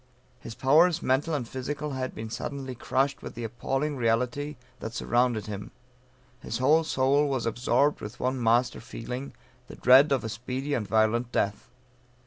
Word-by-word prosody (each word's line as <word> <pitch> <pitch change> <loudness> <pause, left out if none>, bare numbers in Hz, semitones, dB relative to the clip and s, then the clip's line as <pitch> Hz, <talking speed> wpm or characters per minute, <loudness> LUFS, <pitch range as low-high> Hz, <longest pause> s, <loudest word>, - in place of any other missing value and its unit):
His 115 - -9
powers, 165 +7 +4
mental 145 +5 +1
and 125 -5 -3
physical 145 +4 -4
had 130 -1 -4
been 110 0 -6
suddenly 135 +1 -5
crushed 135 +3 -1
with - - -8
the 120 - -5
appalling 135 +6 -2
reality 125 +5 0 0.2
that 115 +1 -6
surrounded 120 -3 +1
him; 105 -1 -6 0.7
his 115 - -4
whole 150 +6 +4
soul 140 0 +2
was 130 -4 -1
absorbed 125 +5 +1
with 105 +3 -8
one 130 0 -1
master 120 +2 +2
feeling, 125 +4 -6 0.3
the - - -10
dread 135 +4 +6
of 135 -4 +2
a 110 - -3
speedy 125 +6 -4
and 110 -7 -1
violent 110 +3 +2
death. 100 -2 -1
125 Hz, 160 wpm, -27 LUFS, 115-140 Hz, 0.7 s, dread